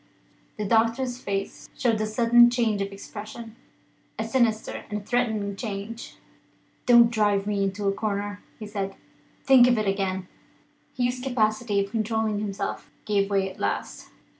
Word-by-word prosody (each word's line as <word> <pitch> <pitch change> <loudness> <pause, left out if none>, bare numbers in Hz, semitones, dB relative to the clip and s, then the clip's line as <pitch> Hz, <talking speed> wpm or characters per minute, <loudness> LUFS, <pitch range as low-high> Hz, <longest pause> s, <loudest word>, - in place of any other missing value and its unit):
The 210 - -2
doctor's 230 +4 +1
face 195 -3 -4
showed 230 -4 +1
a 215 - 0
sudden 240 +2 +5
change 230 -4 0
of 195 0 -3
expression 215 +3 -9 0.6
a 220 - -1
sinister 225 -2 0
and 210 -1 -4
threatening 220 -5 0
change. 215 +1 -6 0.7
"Don't 235 -1 +7
drive 205 -3 +2
me 205 -1 -1
into 195 +1 -2
a 195 - +2
corner," 205 0 -3 0.2
he 215 - -7
said. 200 -2 -4 0.5
"Think 260 -3 +7
of 245 -1 +3
it 215 -1 0
again." 190 -1 -1 0.7
Hugh's 245 0 0
capacity 215 -5 0
for 200 - -15
controlling 220 -1 0
himself 200 -2 -4 0.2
gave 200 -1 +1
way 195 -1 +1
at - - -15
last. - - -3
215 Hz, 145 wpm, -25 LUFS, 200-235 Hz, 0.7 s, Don't